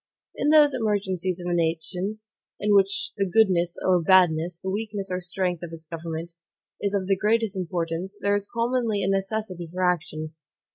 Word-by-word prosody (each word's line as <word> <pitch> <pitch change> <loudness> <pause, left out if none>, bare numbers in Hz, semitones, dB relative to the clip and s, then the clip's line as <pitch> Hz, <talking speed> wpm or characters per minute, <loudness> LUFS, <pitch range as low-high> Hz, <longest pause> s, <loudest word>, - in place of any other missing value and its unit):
In 295 - 0
those 300 -2 +6
emergencies 190 -6 -1
of 175 - -6
a 175 - 0
nation, 175 +5 -1 0.4
in 210 0 +2
which 195 0 +2
the 195 -2 0
goodness 175 -4 +3
or 180 -2 +4
badness, 170 -1 +3
the 190 - -4
weakness 205 -2 -3
or 180 - -1
strength 180 -1 -2
of 170 -2 -7
its 165 0 -10
government, 165 +1 -6 0.5
is 200 0 0
of 195 -2 0
the 195 +1 +2
greatest 215 +1 +1
importance, 180 +1 -3
there 200 - +1
is 205 0 -1
commonly 230 -3 0
a - - 0
necessity 195 -2 -2
for 185 +1 -2
action. 155 -3 -1
190 Hz, 175 wpm, -25 LUFS, 175-205 Hz, 0.5 s, those